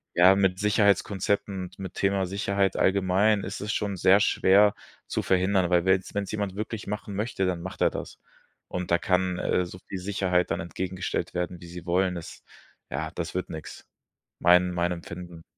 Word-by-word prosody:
ja, 90 +2 +7
mit 95 -1 +1
Sicherheitskonzepten 100 -1 +1
und 90 - -11
mit 95 -2 -6
Thema 95 -1 +1
Sicherheit 100 0 0
allgemein 100 +2 +3
ist - - -6
es 105 +1 -2
schon 100 -2 -1
sehr 95 +3 +5
schwer 100 +2 +4 0.3
zu - - -1
verhindern, 95 -1 +2
weil 90 0 +3
wenn's 95 0 +1
wenn's 100 -2 -2
jemand 100 -3 -3
wirklich 105 0 -5
machen 105 0 -5
möchte, 105 -2 -1
dann 90 -2 -1
macht 95 - -7
er - - +4
das. - - -7 0.5
Und 90 -1 -4
da 85 - +5
kann, 90 -1 +1
äh, 90 - +1
so 90 +1 -9
viel 95 - -5
Sicherheit 90 -2 0
dann 85 - 0
entgegengestellt 95 +2 -4
werden, 90 0 -3
wie 85 - -10
sie 85 0 -9
wollen. 90 +1 +1
Es 85 - -10 0.5
ja, 80 +4 -3
das 85 -1 -5
wird 90 - -2
nix. 80 -1 -8 0.5
Mein 90 +1 +5
mein 90 0 0
empfinden. 85 -1 -8
95 Hz, 180 wpm, -26 LUFS, 90-100 Hz, 0.5 s, ja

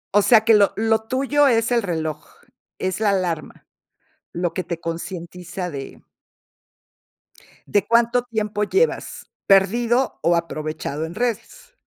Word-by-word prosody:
O 205 - +6
sea, 225 0 +6
que 225 - +6
lo 205 -2 +4
lo 220 0 +2
tuyo 275 +2 +2
es 230 -2 +2
el 235 -1 +3
reloj, 160 -5 -3 0.5
es 185 +2 -2
la 215 -2 +2
alarma, 180 -5 -2 0.7
lo 175 -1 -2
que 185 - -2
te 170 -2 -5
concientiza 175 +2 -6
de 140 -4 -8 1.7
de 205 -1 +1
cuánto 235 +1 +3
tiempo 215 -3 -2
llevas 440 - -1 0.2
perdido 235 +6 +3
o 170 +1 +3
aprovechado 155 -2 -3
en 165 - -9
redes. 480 - -4
200 Hz, 130 wpm, -22 LUFS, 170-235 Hz, 1.7 s, O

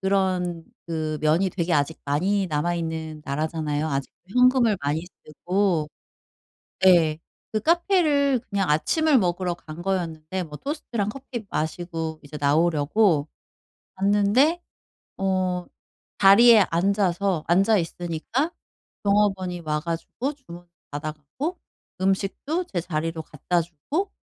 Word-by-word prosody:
그런 185 -3 0 0.2
그 155 -2 -2
면이 165 +5 +2
되게 170 -1 -2
아직 150 +1 +1
많이 185 +8 +1
남아있는 160 -1 -2
나라잖아요 155 +1 -2
아직도 140 -1 -4 0.2
현금을 250 -3 +4
많이 150 +4 -1 0.2
쓰고. 175 0 0 1.0
예. 160 -4 +5 0.3
그 215 - 0
카페를 310 - +3
그냥 195 -3 0
아침을 300 - +3
먹으러 180 -2 0
간 160 -1 -10
거였는데 175 -1 -2
뭐 150 -4 -8
토스트랑 240 - -3
커피 240 -2 -7
마시고 160 -1 -3
이제 150 +1 -8
나오려고 155 +3 +2 0.7
갔는데 205 - +3 0.6
어 185 -2 0 0.5
자리에 220 +3 +8
앉아서 190 -1 +1
앉아 195 +6 +4
있으니까 175 - -2 0.5
종업원이 195 -3 +1
와 150 -1 -1
가지고 170 - -3
주문을 175 -12 -13 0.2
받아 145 +2 -3
갖고 155 - -6 0.4
음식도 195 - 0
제 175 - 0
자리로 165 -1 -3
갖다 165 +3 -1
주고 175 - -3
180 Hz, 260 characters per minute, -24 LUFS, 160-205 Hz, 1.0 s, 자리에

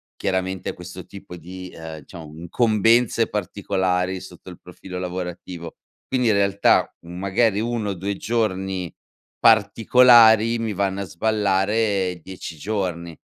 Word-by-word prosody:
chiaramente 95 -1 -2
questo 90 +1 -10
tipo 100 -2 -11
di, 90 +2 -9
ehm, 80 -1 -8
diciamo 80 0 -11
incombenze 115 +5 +2
particolari 95 -2 -1
sotto 95 -1 -12
il 90 - -12
profilo 90 +1 -10
lavorativo. 90 -1 -6 0.3
Quindi 125 -2 0
in - - +4
realtà, 100 0 +2
mhmm, 85 +1 -10
magari 100 +3 +1
1 115 -2 -2
o - - -1
2 100 +3 -3
giorni 95 -6 -2 0.5
particolari 115 +1 +5
mi 115 -1 -2
vanno 100 0 -1
a - - -2
sballare 100 0 0
10 90 -2 -8
giorni. 85 -3 -4
95 Hz, 125 wpm, -22 LUFS, 90-110 Hz, 0.5 s, particolari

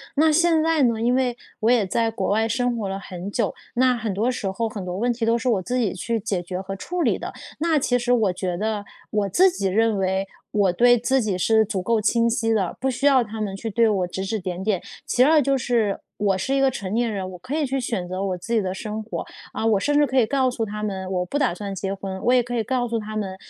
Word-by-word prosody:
那 315 +2 +4
现 330 0 +3
在 325 -2 +3
呢， 230 -3 +2
因 240 +2 +2
为 255 -2 +1 0.2
我 220 - +2
也 235 -5 +3
在 225 +4 +1
国 225 - -2
外 220 +2 +2
生 245 +1 0
活 210 -3 -2
了 195 0 -3
很 185 -1 -7
久， 215 -2 0 0.2
那 255 +1 +4
很 220 -3 -2
多 220 +6 +1
时 215 -6 -3
候、 225 +4 -2
很 205 -4 -6
多 180 0 -4
问 240 +4 +1
题 235 -1 -2
都 230 +1 +3
是 235 +2 -1
我 210 -6 +2
自 245 +7 -2
己 225 -7 +1
去 225 +5 -2
解 195 -3 -2
决 180 +1 -5
和 195 0 -5
处 355 - -4
理 - - +2
的， - - -6 0.3
那 325 0 +2
其 245 -2 +1
实 240 +1 -1
我 215 -6 +2
觉 180 -1 -3
得， 210 0 -2 0.3
我 210 -2 0
自 370 - +5
己 200 - -2
认 220 +2 +2
为， 190 0 0 0.3
我 200 -3 +3
对 245 +7 +5
自 260 +3 +1
己 205 -5 -1
是 220 +4 +3
足 195 -2 -2
够 225 +4 +1
清 230 +2 +2
晰 225 -1 +1
的， 195 -5 -1
不 265 - 0
需 260 +2 -2
要 270 -3 +5
他 220 0 -6
们 200 -2 -2
去 225 +4 -5
对 230 +1 +3
我 190 -4 0
指 190 +2 -4
指 215 +3 -2
点 180 -1 -4
点。 195 -3 0 0.3
其 250 - +4
2 305 +2 +5
就 275 0 +2
是， 230 -5 0 0.2
我 200 -2 +1
是 265 +8 -1
一 275 - +2
个 270 - +5
成 200 -6 -5
年 235 0 +1
人， 195 -3 -3
我 180 - -9
可 255 +11 -5
以 310 - +1
去 270 0 -1
选 225 -7 -2
择 185 +2 -3
我 190 -2 -1
自 200 +7 -5
己 225 - +3
的 185 -2 -2
生 215 +3 -5
活， 215 - -5 0.3
啊， - - -2
我 220 -3 +3
甚 290 +7 +1
至 295 - +5
可 265 -1 +1
以 235 - +4
告 260 0 +2
诉 240 -2 -2
他 210 0 -4
们， 190 -2 -3
我 180 -1 0
不 285 +11 -2
打 255 -11 +1
算 200 +1 -5
结 195 0 -3
婚， 190 -1 -6
我 245 - +3
也 250 -1 +4
可 245 +1 -4
以 235 - +1
告 245 +1 -1
诉 230 -1 -1
他 215 0 -7
们， 195 -3 -3
220 Hz, 295 characters per minute, -23 LUFS, 195-245 Hz, 0.3 s, 自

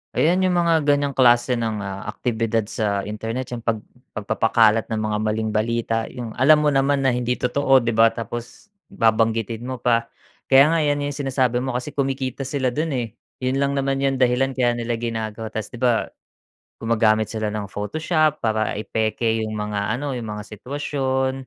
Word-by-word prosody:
Ayan, 175 +4 +3
yung 185 -1 +2
mga 165 -3 +2
ganiyang 145 -1 +2
klase 120 -1 +3
ng, 110 -3 -2
ah, 100 +1 -6
aktibidad 115 -1 -1
sa 105 -2 -2
internet 115 +5 -5
yung 120 - -4
pag 110 -2 -2 0.3
pagpapakalat 110 0 +2
ng 110 -1 -2
mga 105 0 -1
maling 110 0 -1
balita, 115 +1 -1
yung, 120 -3 -7
alam 150 +3 +6
mo 150 - +3
naman 135 0 +2
na 130 - +3
hindi 125 0 -1
totoo, 135 +1 +2
'di 115 - 0
ba, 115 0 +5
tapos 115 - -6 0.2
babanggitin 115 +1 0
mo 130 - -3
pa. 115 -1 +2 0.4
Kaya 140 +3 +6
nga, 165 - +2
yan 145 -1 +1
yung 145 - -2
sinasabi 130 -3 0
mo, 130 -1 -3
kasi 125 +4 -3
kumikita 135 -1 -2
sila 130 -2 -1
do'n 155 +5 -2
eh, 120 -2 -1 0.4
'yon 130 +1 0
lang 140 0 +1
naman 135 0 0
yung 135 -1 +1
dahilan, 130 +1 +1
kaya 125 -2 +2
nila 120 0 -1
ginagawa, 110 -1 -4
tas, 110 -1 -4
'di - - -10
ba, 120 -2 +1 0.7
gumagamit 110 -1 +2
sila 110 -1 -2
ng 105 -1 -4
Photoshop 155 - 0
para 110 -2 -1
i-peke 110 +1 -1
yung 110 0 -4
mga 105 +2 -2
ano, 145 +1 -3
yung 110 -4 -5
mga 105 - -7
sitwasyon. 130 +3 -2
120 Hz, 180 wpm, -22 LUFS, 110-135 Hz, 0.7 s, alam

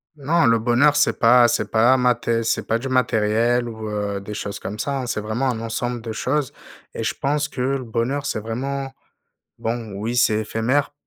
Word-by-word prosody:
Non, 155 +2 +1
le 115 -1 +4
bonheur, 125 +6 +3
c'est 145 - +2
pas 120 +1 +6
c'est 120 - -1
pas 120 +4 +4
maté 120 -2 +1
c'est 115 - -1
pas 115 - +2
du 130 +3 -5
matériel 120 -1 +1
ou 110 -2 -6
heu, 105 -1 -3
des 105 +1 -7
choses 100 -1 -5
comme 105 - -6
ça, 140 +3 -2
hein. 125 - -5
C'est 105 - -2
vraiment 115 +5 -1
un 115 -3 -2
ensemble 120 +1 -3
de 110 0 -6
choses, 130 +4 -1 0.4
et - - -4
je 110 - -1
pense 145 +2 0
que 125 - -5
le 135 0 0
bonheur, 120 +5 -2
c'est 140 - -2
vraiment 135 +5 -4 0.7
bon, 115 -2 -4
oui, 110 +4 -3
c'est 110 -3 +3
éphémère, 120 +7 0
120 Hz, 200 wpm, -22 LUFS, 110-130 Hz, 0.7 s, pas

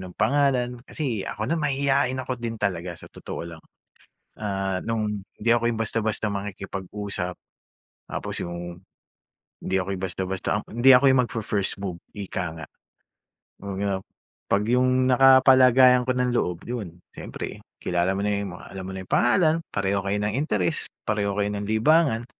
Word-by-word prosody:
anong 90 -1 -9
pangalan. 125 -4 +1
Kasi 125 -10 -2
ako 105 - -4
na 165 - 0
mahiyain 140 -2 +1
ako 130 -1 -4
din 115 -1 -3
talaga 90 -4 -2
sa - - -12
totoo 85 0 -7
lang. 80 - -12 0.8
Ah, 95 -3 -2
nung 110 -2 0 0.2
hindi 115 +2 -1
ako 120 0 +3
yung 115 -1 -1
basta-basta 110 -1 -1
makikipag-usap 100 -1 -5 0.7
tapos - - -5
yung 85 0 -6 0.8
hindi 95 - -1
ako 95 - -4
yung 95 - -7
basta-basta 95 0 -3 0.2
hindi 120 +4 +4
ako 125 +1 +7
yung 130 -1 +6
magfi-first, 105 -3 -1
move 90 -3 -5 0.2
ika 95 -2 -3 0.2
nga. 80 - -7 0.9
'Pag 100 -1 -5
yap 95 -1 -1 0.5
'pag 100 +1 +3
yung 130 +1 +3
nakapalagayan 130 -1 +6
ko 130 - -2
ng 125 0 0
loob, 90 -7 0
yun 105 -8 -5 0.2
siyempre - - -7 0.2
kilala 90 +2 0
mo - - -1
na - - +1
yung 100 -3 -4
alam 95 - -9
mo 95 - -6
na 95 -1 -7
yung - - -17
pangalan, 155 +6 +4 0.2
pareho 100 0 0
kayo 100 +1 -1
ng 105 +1 -1
interes, 105 - -1 0.2
pareho 100 -2 0
kayo 100 - +2
ng 100 - -3
libangan. 120 0 +3
105 Hz, 160 wpm, -25 LUFS, 95-125 Hz, 0.9 s, ako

